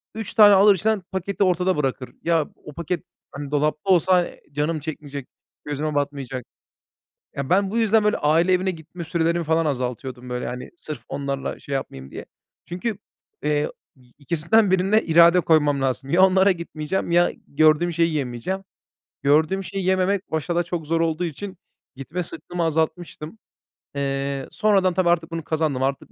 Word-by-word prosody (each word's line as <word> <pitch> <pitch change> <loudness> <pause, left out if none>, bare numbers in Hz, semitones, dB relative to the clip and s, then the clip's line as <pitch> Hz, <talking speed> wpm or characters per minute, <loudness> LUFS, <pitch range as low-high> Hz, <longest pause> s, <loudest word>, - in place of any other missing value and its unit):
3 220 -3 -4
tane 205 -2 +8
alır 200 +1 +6
içinden, 215 +3 0
paketi 190 +1 -1
ortada 185 -1 +2
bırakır. 135 -3 -2
Ya, 165 -3 +2 0.2
o 150 - -10
paket, 170 +1 -3 0.3
hani, 140 0 -7
dolapta 150 +4 0
olsa 180 0 +3 0.2
canım 150 +3 -1
çekmeyecek, 145 -3 -7 0.4
gözüme 150 +1 -3
batmayacak. 140 -3 -3 0.9
Ya, 140 -1 -4
ben 195 +1 +2
bu 225 - -1
yüzden, 220 -1 +3
böyle, 210 - +2
aile 165 +5 +3
evine 185 +1 +1
gitme 165 +1 -9
sürelerimi 170 +1 0
falan 160 +1 +1
azaltıyordum, 125 -2 -3
böyle, 125 0 -3
hani, 125 0 -6
sırf 155 -8 -8
onlarla 140 -1 -3
şey 140 - -7
yapmayayım 65 - -6
diye. - - -8 0.4
Çünkü, 185 +5 -4 0.5
eee, 150 0 +1 0.3
y 125 -2 -24
2'sinden 170 +8 +2
1'ine 190 +4 +3
irade 170 +2 +6
koymam 150 -4 +3
lazım. 135 0 -2
Ya 175 +5 +4
onlara 190 +1 +4
gitmeyeceğim, 170 0 -3
ya 175 +1 +4 0.2
gördüğüm 155 +3 +3
şeyi 165 0 +1
yemeyeceğim. 145 +7 -3 0.6
Gördüğüm 155 +7 +3
şeyi 195 0 -4
yememek 190 +1 +1
başta 160 +2 -1
da 175 - +2
çok 170 -2 -5
zor 165 +1 +1
olduğu 165 +1 0
için 185 +4 -6 0.4
gitme 155 +7 -4
sıktığımı 170 +2 -5
azaltmıştım. 160 +3 -2 0.6
Eee, 140 -1 -2
sonradan, 200 -5 +2
tabii, 180 -1 +2
artık 170 -1 +1
bunu 165 -1 -4
kazandım. 155 -4 -1
Artık, 135 +1 -2
165 Hz, 160 wpm, -23 LUFS, 145-185 Hz, 0.9 s, tane